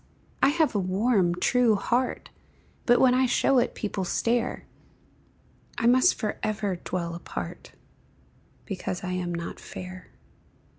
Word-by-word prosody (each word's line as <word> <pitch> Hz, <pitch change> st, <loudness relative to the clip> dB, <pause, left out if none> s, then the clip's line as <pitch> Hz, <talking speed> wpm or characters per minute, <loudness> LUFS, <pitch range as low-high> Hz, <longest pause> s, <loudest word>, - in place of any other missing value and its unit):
I -, -, +6 dB
have 315 Hz, +1 st, +2 dB
a 205 Hz, -, +1 dB
warm, 190 Hz, -1 st, +2 dB
true 235 Hz, +4 st, +3 dB
heart, 245 Hz, +5 st, -1 dB, 0.6 s
But 240 Hz, 0 st, +5 dB
when 255 Hz, -1 st, +5 dB
I 255 Hz, 0 st, +3 dB
show 260 Hz, +1 st, +3 dB
it 245 Hz, -, -1 dB
people 205 Hz, -2 st, -3 dB
stare; 230 Hz, +6 st, -1 dB, 1.1 s
I 235 Hz, -, -1 dB
must 255 Hz, +2 st, +5 dB
forever 210 Hz, -2 st, -2 dB
dwell 170 Hz, -1 st, -4 dB
apart, 170 Hz, -, -7 dB, 0.9 s
Because 190 Hz, -2 st, -4 dB
I 185 Hz, -, -3 dB
am 180 Hz, -1 st, -2 dB
not 170 Hz, 0 st, -5 dB
fair. 185 Hz, 0 st, -9 dB
210 Hz, 130 wpm, -26 LUFS, 185-245 Hz, 1.1 s, I